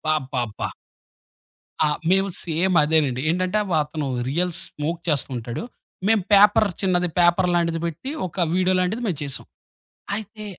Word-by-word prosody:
అబ్బాబ్బబ్బా! 130 Hz, -6 st, -3 dB, 1.2 s
ఆ! -, -, +3 dB, 0.2 s
మేము 195 Hz, +1 st, +3 dB
సేమ్ 175 Hz, +3 st, +1 dB
అదేనండి. 150 Hz, -4 st, +2 dB
ఏంటంటే 185 Hz, +4 st, 0 dB, 0.2 s
అతను 150 Hz, 0 st, -4 dB, 0.2 s
రియల్ 175 Hz, +5 st, 0 dB
స్మోక్ 165 Hz, +3 st, -4 dB
చేస్తూ 145 Hz, -2 st, +1 dB
ఉంటాడు. 120 Hz, -, -5 dB, 0.5 s
మేము 220 Hz, -4 st, +4 dB
పేపర్ 205 Hz, +1 st, +6 dB
చిన్నది 180 Hz, -2 st, +1 dB
పేపర్ 175 Hz, +1 st, +4 dB
లాంటిది 170 Hz, -1 st, +1 dB
పెట్టి 170 Hz, -, -5 dB, 0.2 s
ఒక 180 Hz, 0 st, -1 dB
వీడియో 185 Hz, 0 st, +2 dB
లాంటిది 195 Hz, +7 st, -1 dB
మేము 175 Hz, -8 st, -2 dB
చేసాం. 140 Hz, -2 st, -5 dB, 0.7 s
అయితే 215 Hz, +1 st, -6 dB
175 Hz, 130 wpm, -23 LUFS, 150-190 Hz, 1.2 s, పేపర్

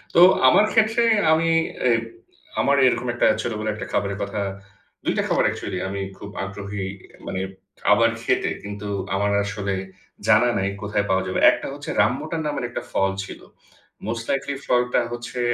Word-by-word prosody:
তো -, -, +6 dB, 0.3 s
আমার 200 Hz, +11 st, +6 dB
ক্ষেত্রে 225 Hz, +1 st, +3 dB, 0.3 s
আমি 165 Hz, +1 st, +3 dB, 0.4 s
এ -, -, +4 dB, 0.7 s
আমার 140 Hz, -, +3 dB
এরকম 125 Hz, -, 0 dB
একটা 120 Hz, -, +3 dB
ছোট 120 Hz, -, -3 dB
বেলায় 110 Hz, 0 st, -1 dB
একটা 105 Hz, -, -6 dB
খাবারের 100 Hz, -1 st, 0 dB
কথা 100 Hz, +1 st, -3 dB, 0.6 s
২২ -, -, 0 dB
টা -, -, +2 dB
খাবার -, -, +2 dB
অ্যাকচুয়ালি, -, -, -3 dB
আমি 100 Hz, 0 st, -4 dB, 0.2 s
খুব 100 Hz, -, -9 dB
আগ্রহী 100 Hz, 0 st, -5 dB, 0.4 s
মানে 95 Hz, -, -3 dB, 0.5 s
আবার 115 Hz, +3 st, +5 dB
খেতে, -, -, +1 dB
কিন্তু 105 Hz, 0 st, -6 dB, 0.3 s
আমার 100 Hz, +1 st, +1 dB
আসলে 100 Hz, -1 st, -3 dB, 0.5 s
জানা 120 Hz, +3 st, +5 dB
নাই 95 Hz, 0 st, 0 dB
কোথায় 105 Hz, 0 st, 0 dB
পাওয়া 95 Hz, 0 st, +2 dB
যাবে। 95 Hz, -, -1 dB
একটা -, -, -4 dB
হচ্ছে 145 Hz, +1 st, -8 dB
রামবুটান 155 Hz, +8 st, 0 dB
নামের 145 Hz, -5 st, -2 dB
একটা -, -, -4 dB
ফল 95 Hz, 0 st, +1 dB
ছিল। -, -, -9 dB, 0.7 s
মোস্ট 115 Hz, +2 st, -3 dB
লাইকলি 135 Hz, +1 st, -1 dB
ফলটা 125 Hz, 0 st, +2 dB
হচ্ছে 120 Hz, +1 st, -6 dB
110 Hz, 160 wpm, -23 LUFS, 100-125 Hz, 0.7 s, তো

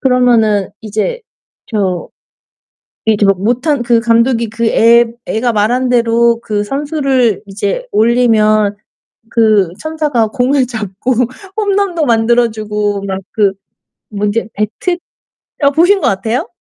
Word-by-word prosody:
그러면은 235 Hz, -6 st, +2 dB
이제 220 Hz, -, -3 dB, 0.5 s
저 190 Hz, -5 st, -2 dB, 1.0 s
이제 215 Hz, -2 st, +2 dB
막 195 Hz, -2 st, +2 dB
못한 250 Hz, +6 st, 0 dB
그 235 Hz, -1 st, +3 dB
감독이 230 Hz, 0 st, +2 dB
그 230 Hz, +2 st, -2 dB
애 235 Hz, +1 st, +5 dB, 0.2 s
애가 235 Hz, +2 st, -1 dB
말한 240 Hz, +5 st, +1 dB
대로 235 Hz, -1 st, +2 dB
그 210 Hz, -2 st, -2 dB
선수를 270 Hz, -, 0 dB
이제 200 Hz, -, -3 dB
올리면 215 Hz, -3 st, +2 dB, 0.6 s
그 215 Hz, -5 st, +3 dB
천사가 300 Hz, -7 st, -1 dB
공을 255 Hz, +2 st, +1 dB
잡고 220 Hz, 0 st, -3 dB, 0.4 s
홈런도 400 Hz, -6 st, 0 dB
만들어주고 220 Hz, -3 st, 0 dB
막 190 Hz, -1 st, -3 dB
그 205 Hz, -3 st, +2 dB, 0.6 s
뭐 205 Hz, -1 st, -3 dB
인제 210 Hz, +1 st, -1 dB
배트 215 Hz, -, -2 dB, 0.7 s
어 280 Hz, -, +5 dB
보신 355 Hz, +7 st, +3 dB
것 -, -, +1 dB
같아요? 220 Hz, +5 st, -1 dB
230 Hz, 230 characters per minute, -14 LUFS, 210-255 Hz, 1.0 s, 애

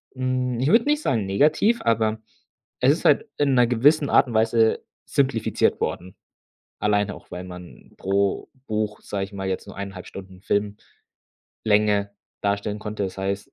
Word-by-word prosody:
Hm, 130 Hz, -1 st, -1 dB
ich 130 Hz, -, +1 dB
würde 225 Hz, +8 st, +4 dB
nicht 295 Hz, +1 st, +1 dB
sagen 115 Hz, -, 0 dB
negativ, 155 Hz, -, +2 dB
aber 110 Hz, -1 st, +1 dB, 0.6 s
es -, -, +5 dB
ist -, -, -2 dB
halt -, -, +4 dB
in 145 Hz, -2 st, +2 dB
'ner 125 Hz, -2 st, +4 dB
gewissen 140 Hz, +5 st, +3 dB
Art -, -, +5 dB
und 120 Hz, -, -6 dB
Weise 110 Hz, 0 st, +2 dB, 0.2 s
simplifiziert 130 Hz, -5 st, +1 dB
worden. 95 Hz, +2 st, -3 dB, 0.6 s
Alleine 105 Hz, -1 st, +1 dB
auch, -, -, -16 dB
weil 90 Hz, -, -6 dB
man 90 Hz, -1 st, -12 dB
pro 100 Hz, 0 st, 0 dB, 0.2 s
Buch, 105 Hz, -1 st, -2 dB
sage 100 Hz, -1 st, -3 dB
ich 100 Hz, -, -16 dB
mal, 95 Hz, -1 st, -4 dB
jetzt 95 Hz, -, -4 dB
nur -, -, -10 dB
1,5 95 Hz, -2 st, -7 dB
Stunden 95 Hz, -1 st, -11 dB, 1.0 s
Filmlänge 105 Hz, -1 st, +1 dB, 0.3 s
darstellen 100 Hz, +1 st, -2 dB
konnte. 105 Hz, -1 st, -4 dB
Das 95 Hz, -, -6 dB
heißt, 100 Hz, +1 st, -3 dB
105 Hz, 160 wpm, -23 LUFS, 100-125 Hz, 1.0 s, es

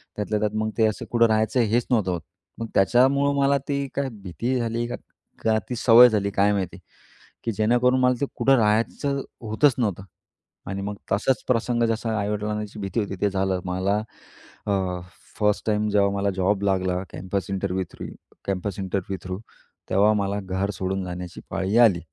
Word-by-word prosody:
त्यातल्या 105 Hz, 0 st, -1 dB
त्यात 105 Hz, 0 st, -1 dB
मग 110 Hz, 0 st, 0 dB
ते 110 Hz, -, +4 dB
असं 110 Hz, -, -3 dB
कुठं 115 Hz, -1 st, +5 dB
राहायचं 110 Hz, +3 st, +2 dB
हेच 120 Hz, +3 st, +1 dB
नव्हतं 105 Hz, -6 st, +2 dB
होत. 85 Hz, -2 st, -3 dB, 0.4 s
मग 115 Hz, -, -3 dB
त्याच्यामुळं 135 Hz, +7 st, +4 dB
मला 140 Hz, 0 st, +4 dB
ती 140 Hz, -1 st, -1 dB
काय 140 Hz, -1 st, -1 dB
भीती 115 Hz, -, -2 dB
झाली 115 Hz, 0 st, -1 dB
का, -, -, -4 dB, 0.5 s
का 110 Hz, -1 st, +3 dB
ती 125 Hz, -, -2 dB
सवय 120 Hz, +1 st, +8 dB
झाली? 100 Hz, -2 st, 0 dB
काय 100 Hz, +1 st, +3 dB
माहिती? 95 Hz, -4 st, -3 dB, 0.6 s
की 115 Hz, -, -1 dB
जेणेकरून 120 Hz, +4 st, +2 dB
मला 125 Hz, 0 st, +4 dB
ते -, -, +3 dB
कुठं 135 Hz, 0 st, +4 dB
राहायचं 115 Hz, +6 st, +1 dB, 0.2 s
होतच 115 Hz, +5 st, +2 dB
नव्हतं 100 Hz, -6 st, -1 dB, 0.7 s
आणि 100 Hz, 0 st, -3 dB
मग 100 Hz, 0 st, -4 dB, 0.2 s
तसाच 115 Hz, +6 st, +1 dB
प्रसंग 120 Hz, -1 st, +1 dB
जसा 115 Hz, -1 st, -1 dB
आई-वडिलांची 105 Hz, +1 st, -3 dB
भीती 100 Hz, +3 st, -2 dB
होती 100 Hz, -1 st, -4 dB
ते 105 Hz, -, +3 dB
झालं. 95 Hz, -1 st, 0 dB
मला 95 Hz, +3 st, 0 dB, 0.7 s
अ, 95 Hz, -3 st, 0 dB, 0.4 s
फर्स्ट 105 Hz, -1 st, +1 dB
टाईम 105 Hz, 0 st, +1 dB
जेव्हा 100 Hz, -1 st, +3 dB
मला 100 Hz, 0 st, 0 dB
जॉब 95 Hz, +2 st, +1 dB
लागला 95 Hz, -2 st, +1 dB
campus 95 Hz, +1 st, -4 dB
interview 95 Hz, -1 st, -1 dB
through -, -, -7 dB, 0.4 s
campus 100 Hz, +1 st, -3 dB
interview 95 Hz, 0 st, -3 dB
through 95 Hz, 0 st, -5 dB, 0.5 s
तेव्हा 105 Hz, +3 st, +4 dB
मला 100 Hz, -1 st, -1 dB
घर 95 Hz, +1 st, -2 dB
सोडून 95 Hz, 0 st, -2 dB
जाण्याची 90 Hz, 0 st, -7 dB
पाळी 95 Hz, +4 st, 0 dB
आली 110 Hz, -8 st, +6 dB
105 Hz, 170 wpm, -24 LUFS, 95-115 Hz, 0.7 s, सवय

